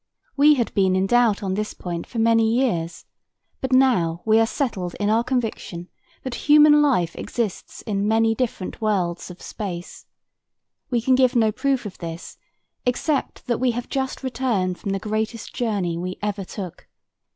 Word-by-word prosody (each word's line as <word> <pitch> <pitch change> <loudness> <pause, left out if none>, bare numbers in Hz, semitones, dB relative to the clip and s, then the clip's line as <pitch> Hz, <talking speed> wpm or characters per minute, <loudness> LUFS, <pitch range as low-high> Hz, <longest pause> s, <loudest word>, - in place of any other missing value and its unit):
We 295 +1 +6
had 240 -4 -1
been 190 -2 +2
in 190 +1 +2
doubt 230 -1 +3
on 190 -1 -1
this 210 +2 -3
point 170 -2 -5
for - - -8
many 225 0 +3
years, 220 -10 -1 0.5
but 265 - -3
now 225 -11 +3
we 220 0 +5
are 225 - +3
settled 200 - -3
in 205 0 0
our 225 +2 +3
conviction 225 -8 -3 0.3
that 260 - -4 0.2
human 295 0 +7
life 180 - +2
exists 225 -6 -4
in 200 -1 -1
many 225 +1 +3
different 225 -6 -3
worlds 185 -6 -1
of 180 - -11
space. 180 -5 -7 0.8
We 240 -2 +1
can 260 - +3
give 255 0 +3
no 220 -2 +4
proof 265 +1 -1
of 205 - -8
this 165 0 -7 0.4
except 265 +4 -1
that 240 -3 -1
we 255 - +2
have 245 - -5
just 265 -1 -3
returned 235 -9 -1
from 200 - -5
the 195 - 0
greatest 215 +2 -3
journey 195 -8 -1
we 185 +1 -4
ever 205 -2 -2
took. 180 -3 -8
220 Hz, 170 wpm, -23 LUFS, 185-250 Hz, 0.8 s, human